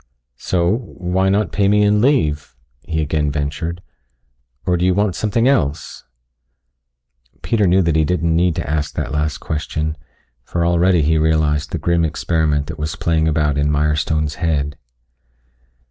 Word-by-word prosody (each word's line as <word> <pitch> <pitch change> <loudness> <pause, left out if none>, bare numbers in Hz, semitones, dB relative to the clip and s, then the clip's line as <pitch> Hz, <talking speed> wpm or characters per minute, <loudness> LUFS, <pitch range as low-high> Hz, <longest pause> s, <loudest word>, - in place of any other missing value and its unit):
"So, 90 +3 +1
why 95 -4 -2
not 100 +2 +1
pay 100 -1 +1
me 105 +1 +4
and 105 0 +3
leave?" 75 - +1 0.3
he 80 0 -2
again 75 0 0
ventured. 80 +5 -3 0.8
"Or 90 - +2
do 85 - -1
you 90 0 +3
want 100 -1 +1
something 115 +3 +1
else?" 80 - -1 1.4
Peter 100 +3 +1
knew 95 +2 +4
that 85 -2 +1
he 80 - +3
didn't 85 0 0
need 85 -1 +2
to - - -4
ask 75 0 -2
that - - -3
last 75 -1 -1
question, 80 0 -3 0.5
for 85 +6 -2
already 85 -1 +3
he 80 +2 +2
realized 75 -1 +1
the - - -3
grim 85 -1 +1
experiment 80 -2 0
that 75 - -8
was 75 +2 -3
playing 80 -2 0
about 75 -2 +1
in 75 0 +1
Mirestone's 75 0 0
head. 75 -4 0
80 Hz, 155 wpm, -19 LUFS, 75-90 Hz, 1.4 s, me